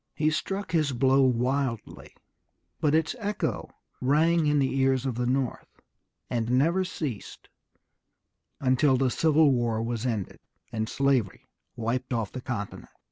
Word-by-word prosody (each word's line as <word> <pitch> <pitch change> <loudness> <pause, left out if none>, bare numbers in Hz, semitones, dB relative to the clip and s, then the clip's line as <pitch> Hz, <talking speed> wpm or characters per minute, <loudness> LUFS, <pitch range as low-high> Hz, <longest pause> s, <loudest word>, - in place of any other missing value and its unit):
He 155 0 +1
struck 195 +3 -3
his 155 -5 +1
blow 135 +2 +3
wildly, 130 -1 -1 0.6
but 150 0 +2
its 160 +8 +1
echo 210 -1 -2 0.3
rang 155 +4 +3
in 150 0 +3
the 135 -1 +1
ears 130 -1 +2
of 130 - -1
the 120 +1 -2
North, 130 -1 -1 0.6
and 115 -2 -2
never 160 +9 +2
ceased 150 - -6 1.1
until 130 +1 +3
the 130 -1 +1
Civil 155 0 +4
War 120 -3 0
was 120 +1 -2
ended, 110 -6 -3 0.3
and 110 0 -2
slavery 135 -7 0 0.3
wiped 125 +2 -2
off 115 -4 -2
the 130 - -6
continent. 110 -6 -5
130 Hz, 135 wpm, -27 LUFS, 120-150 Hz, 1.1 s, Civil